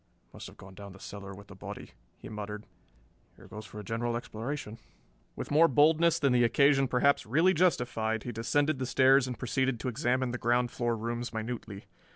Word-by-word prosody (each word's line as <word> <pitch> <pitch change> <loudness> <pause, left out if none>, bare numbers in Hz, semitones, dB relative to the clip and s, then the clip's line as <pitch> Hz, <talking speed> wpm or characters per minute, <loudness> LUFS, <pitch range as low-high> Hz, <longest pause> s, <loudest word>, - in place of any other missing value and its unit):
"Must - - -9
have - - -15
gone 95 0 -13
down 100 0 -10
the 100 - -15
cellar 100 -1 -9
with 100 +1 -13
the - - -13
body," - - -9 0.3
he - - -11
muttered. 105 0 -7 0.7
"Here - - -16
goes 110 0 -9
for 105 - -10
a - - -7
general 115 +3 -2
exploration." 115 0 -6 0.6
With - - -6
more 160 +3 +6
boldness 160 +4 +4
than 140 -5 +2
the 120 -1 +4
occasion 135 +2 +4
perhaps 130 0 +2
really 165 +10 +3
justified 120 - 0
he 120 - -5
descended 140 +6 0
the 130 - -2
stairs 130 0 +4
and 125 - -5
proceeded 130 0 -1
to 130 - -2
examine 125 +2 0
the 125 - -4
ground 120 +1 +1
floor 120 -1 -1
rooms 120 +2 -4
minutely. 110 -3 -6
120 Hz, 190 wpm, -29 LUFS, 110-135 Hz, 0.7 s, more